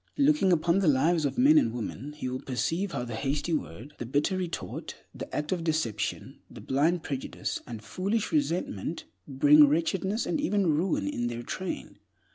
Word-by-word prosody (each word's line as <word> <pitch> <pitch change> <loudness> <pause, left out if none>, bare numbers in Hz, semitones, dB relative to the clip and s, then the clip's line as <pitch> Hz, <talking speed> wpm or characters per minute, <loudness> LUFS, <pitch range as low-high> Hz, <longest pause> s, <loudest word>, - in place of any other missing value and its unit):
Looking 285 -9 +4
upon 170 +2 +3
the 195 - +1
lives 155 +3 +3
of 140 - -2
men 295 +5 +7
and 285 - 0
women, 125 +4 -5
he 150 -4 -5
will 130 0 -3
perceive 165 +9 -1
how 120 - -2
the 120 -1 -6
hasty 140 +7 -1
word, 130 - -4
the 120 - -4
bitter 145 +8 +1
retort, 180 -2 -4 0.2
the - - -8
act 150 0 -3
of 180 -3 -1
deception, 140 -11 -2
the - - -11
blind 160 +6 +1
prejudice 135 -2 -4
and 115 -3 -7
foolish 200 - -2
resentment 180 - -1 0.2
bring 145 +2 +6
wretchedness 190 +8 0
and 300 - -1
even 205 -9 +1
ruin 155 - 0
in 120 +4 -1
their 120 0 -4
train. 185 +9 -5
155 Hz, 175 wpm, -28 LUFS, 130-185 Hz, 0.2 s, men